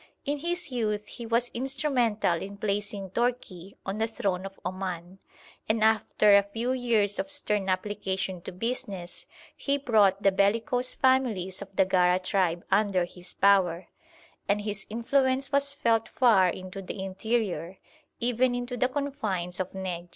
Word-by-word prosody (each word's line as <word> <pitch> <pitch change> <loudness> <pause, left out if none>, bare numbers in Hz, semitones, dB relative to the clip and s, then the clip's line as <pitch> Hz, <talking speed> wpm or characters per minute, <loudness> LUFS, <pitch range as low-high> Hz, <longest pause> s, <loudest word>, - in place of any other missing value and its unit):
In 290 +1 -1
his 345 0 -2
youth 210 -4 -1
he 235 +2 -8
was 235 +1 +1
instrumental 245 - +1
in 200 +1 -7
placing 205 -2 -3
Tourki 205 -6 -2
on 195 +2 -3
the 225 - +1
throne 195 -4 -2
of 195 - -14
Oman, 185 0 -5 0.5
and 220 0 +2
after 215 -1 +4
a 200 - +7
few 225 +5 -3
years 230 -5 +1
of 290 - -2
stern 210 -9 0
application 190 -1 -2
to - - -7
business 190 -3 -5 0.3
he 280 0 0
brought 210 -7 +3
the 195 - +5
bellicose 230 +6 +1
families 235 -9 +1
of 200 -1 -10
the 190 - +4
Gara 180 -1 +3
tribe 185 -2 0
under 200 -4 +3
his 180 +1 -10
power; 190 -3 +3 0.6
and 205 +1 +2
his 205 -1 -5
influence 260 +4 +1
was 280 0 +2
felt 230 -5 +1
far 215 -8 +4
into 185 +2 -6
the 190 - -7
interior, 190 -3 -2 0.4
even 245 +1 +1
into 245 0 -3
the 250 - +3
confines 220 -11 -3
of 185 0 -2
Nejd. 180 -2 -5
205 Hz, 150 wpm, -28 LUFS, 190-245 Hz, 0.6 s, a